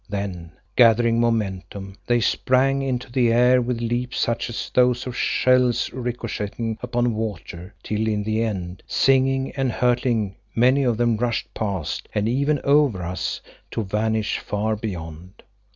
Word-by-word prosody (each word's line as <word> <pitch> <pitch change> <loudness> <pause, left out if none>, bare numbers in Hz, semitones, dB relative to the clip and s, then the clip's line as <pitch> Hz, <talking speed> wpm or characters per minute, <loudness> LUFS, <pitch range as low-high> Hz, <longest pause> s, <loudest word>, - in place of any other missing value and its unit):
Then 95 -5 -5 0.2
gathering 115 -1 +5
momentum, 100 -4 -2
they 120 -1 +2
sprang 135 +4 +2
into 130 -2 -3
the 120 -2 +2
air 125 +2 +5
with 120 -1 -2
leaps 120 +1 -2
such 115 0 -1
as 115 - -5
those 125 -1 +3
of 125 -1 -5
shells 125 -1 +2
ricocheting 115 -3 -4
upon 120 -1 0
water, 105 -4 -6
till 110 +1 -1
in 105 -1 0
the 110 +1 0
end, 95 -5 -3
singing 135 0 +2
and 135 -2 -1
hurtling, 120 -5 0 0.2
many 130 +4 +4
of 120 -4 +1
them 120 -1 +2
rushed 120 0 -2
past 100 -7 -3
and 105 0 +1
even 140 +5 +1
over 140 -10 +3
us 90 +2 -3 0.3
to 115 - -3
vanish 110 +2 -1
far 105 +2 -2
beyond. 90 -3 -7
115 Hz, 145 wpm, -23 LUFS, 105-125 Hz, 0.3 s, gathering